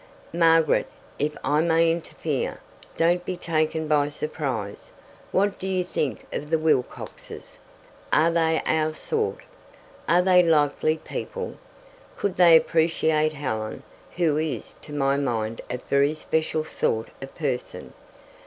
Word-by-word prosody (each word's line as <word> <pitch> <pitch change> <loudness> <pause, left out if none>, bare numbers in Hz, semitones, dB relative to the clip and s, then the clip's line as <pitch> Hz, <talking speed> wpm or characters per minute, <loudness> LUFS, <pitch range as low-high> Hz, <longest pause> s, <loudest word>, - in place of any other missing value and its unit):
"Margaret, 165 -2 +4 0.3
if 150 +1 -1
I 150 +1 +2
may 165 0 +3
interfere, 165 0 -3 0.4
don't 175 +2 +2
be 185 0 -4
taken 160 -2 -1
by 145 -1 +2
surprise. 135 -9 -4 0.4
What 200 +1 +1
do 190 - -4
you 185 -1 0
think 150 -6 -3
of 150 - -4
the 160 - +3
Wilcoxes? 155 -5 -3 0.5
Are 160 +2 +4
they 160 -1 +1
our 155 0 +1
sort? 445 - -2 0.7
Are 175 +1 +5
they 180 -1 +6
likely 155 -1 +2
people? 475 - -6 0.6
Could 200 -3 -2
they 170 -2 +8
appreciate 160 -1 +1
Helen, 110 -7 -4 0.3
who 160 -4 +2
is 155 -1 -3
to - - -12
my 140 -1 +1
mind 115 -5 -2
a 125 - -2
very 140 +4 +1
special 155 0 -1
sort 110 -6 -1
of 135 - -9
person? 135 -6 -4
155 Hz, 130 wpm, -25 LUFS, 145-165 Hz, 0.7 s, they